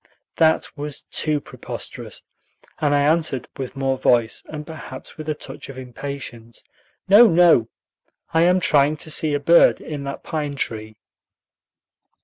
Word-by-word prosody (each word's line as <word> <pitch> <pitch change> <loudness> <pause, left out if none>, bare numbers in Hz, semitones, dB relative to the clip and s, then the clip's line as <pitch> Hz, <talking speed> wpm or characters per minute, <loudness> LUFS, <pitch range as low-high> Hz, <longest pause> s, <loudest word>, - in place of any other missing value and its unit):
That 160 -1 +3
was 145 -1 -5
too 155 -1 0
preposterous, - - -8 0.6
and 145 -2 +2
I 145 - +3
answered 155 -4 +1
with 130 0 -6
more 135 -1 -1
voice, 115 -2 +2
and 150 -1 -7
perhaps 150 -5 -10
with 155 0 -7
a 155 - -1
touch 140 -1 -10
of 135 - -9
impatience, 125 -3 -8 0.4
"No, 210 +5 +8
no; 165 - +5 0.6
I 160 - +4
am 180 +2 +4
trying 150 -3 +3
to 155 - -4
see 150 -1 +2
a - - 0
bird 170 +4 +5
in 145 -2 -6
that 140 - -6
pine 150 -3 -3
tree." 110 -4 -4
145 Hz, 145 wpm, -21 LUFS, 135-155 Hz, 0.6 s, No